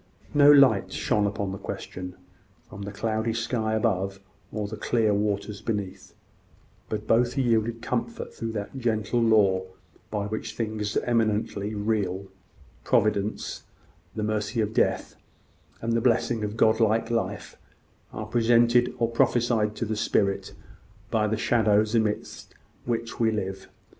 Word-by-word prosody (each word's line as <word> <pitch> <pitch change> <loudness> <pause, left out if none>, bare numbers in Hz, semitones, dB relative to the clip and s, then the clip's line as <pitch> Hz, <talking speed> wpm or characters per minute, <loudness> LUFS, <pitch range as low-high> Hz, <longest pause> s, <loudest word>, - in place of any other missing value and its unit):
No 145 0 +7
light 110 -10 +5
shone 105 +1 +1
upon 100 -1 -3
the 95 - -6
question, 90 0 -6 0.5
from 100 - -10
the 100 0 -5
cloudy 110 +2 -1
sky 115 -1 -1
above, 95 -2 0 0.3
or 105 -2 -3
the 105 - -6
clear 110 -2 +1
waters 100 0 -1
beneath; 105 -4 -4 0.7
but 105 0 -3
both 120 +4 +2
yielded 115 -2 +1
comfort 120 -1 -3
through 115 -1 -5
that 105 +3 -5
gentle 115 -1 0
law 105 -5 +4 0.5
by 105 -2 -2
which 110 +1 -5
things 110 -2 -2
eminently 110 -3 0
real 100 -3 -1 0.6
Providence, 105 0 0 0.5
the 110 - -2
mercy 105 +1 -1
of 110 0 0
death, - - 0 0.7
and 115 0 0
the 115 - +2
blessing 115 -1 +1
of 105 +1 -4
godlike 110 0 +3
life, 115 -1 -2 0.6
are 110 - -5
presented 120 +2 +3
or 115 - +2
prophesied 115 -2 +1
to 115 - -2
the 110 0 -2
spirit 100 -2 0 0.6
by 110 -2 +2
the 110 +1 -1
shadows 110 -2 +2
amidst 110 -2 -2 0.3
which 115 -1 -3
we 115 -1 +3
live. 95 -3 -4
110 Hz, 135 wpm, -26 LUFS, 105-115 Hz, 0.7 s, No